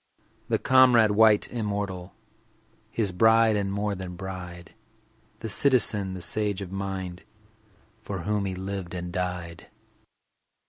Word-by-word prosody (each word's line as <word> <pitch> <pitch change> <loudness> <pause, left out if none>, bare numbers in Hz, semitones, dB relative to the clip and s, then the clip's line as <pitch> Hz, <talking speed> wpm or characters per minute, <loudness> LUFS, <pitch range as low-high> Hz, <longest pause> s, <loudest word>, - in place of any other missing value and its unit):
The - - +2
comrade, 125 -4 +5
white, 105 0 +4
immortal, 100 -5 -4 0.7
His 110 -4 -1
bride, 110 +3 +4
and 100 -1 -2
more 100 +1 -2
than 90 -2 -7
bride— 90 -2 -8 0.7
The 115 - -4
citizen, 105 -6 +3
the 90 - -3
sage 105 +3 +1
of 95 - -10
mind, 95 -2 -5 0.8
For 100 -4 -6
whom 105 -1 -1
he 95 -1 -4
lived 95 -1 -6
and 90 0 -6
died. 90 -2 -5
100 Hz, 125 wpm, -26 LUFS, 90-105 Hz, 0.8 s, comrade